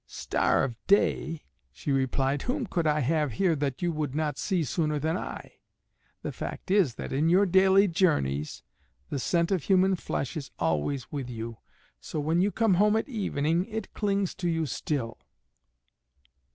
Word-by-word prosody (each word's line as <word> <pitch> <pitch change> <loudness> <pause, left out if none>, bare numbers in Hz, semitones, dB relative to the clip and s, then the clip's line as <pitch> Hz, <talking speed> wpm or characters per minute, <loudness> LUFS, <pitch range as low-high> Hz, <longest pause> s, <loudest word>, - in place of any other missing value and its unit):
"Star - - +1
of 120 - -2
day," 165 -5 +2 0.3
she 140 - -4
replied, 135 +1 +1
"whom 255 +1 -2
could 170 -5 -1
I 150 0 +2
have 150 -1 +1
here 175 - +2
that 140 +1 -2
you 175 - +1
would 150 -4 -3
not 150 -2 -1
see 185 -5 0
sooner 150 +2 0
than 160 +3 0
I? - - -7 0.6
The - - -3
fact - - -6
is 185 - +3
that - - -6
in 150 +4 +2
your 190 +4 +5
daily 190 +2 +5
journeys 75 - 0 0.5
the 140 - -1
scent 170 +6 +1
of 185 -6 0
human 190 0 +4
flesh 140 -6 -3
is 145 -4 -5
always 80 - -1
with 140 -4 -4
you, 115 -1 -6 0.4
so 155 - -5
when 160 +4 +1
you 200 +2 +2
come 225 -2 +2
home 210 +1 +4
at 225 - 0
evening 170 - 0
it 220 -1 -6
clings 200 -2 0
to 175 - +1
you 165 -1 0
still." 125 -3 -3
160 Hz, 170 wpm, -28 LUFS, 135-190 Hz, 0.6 s, your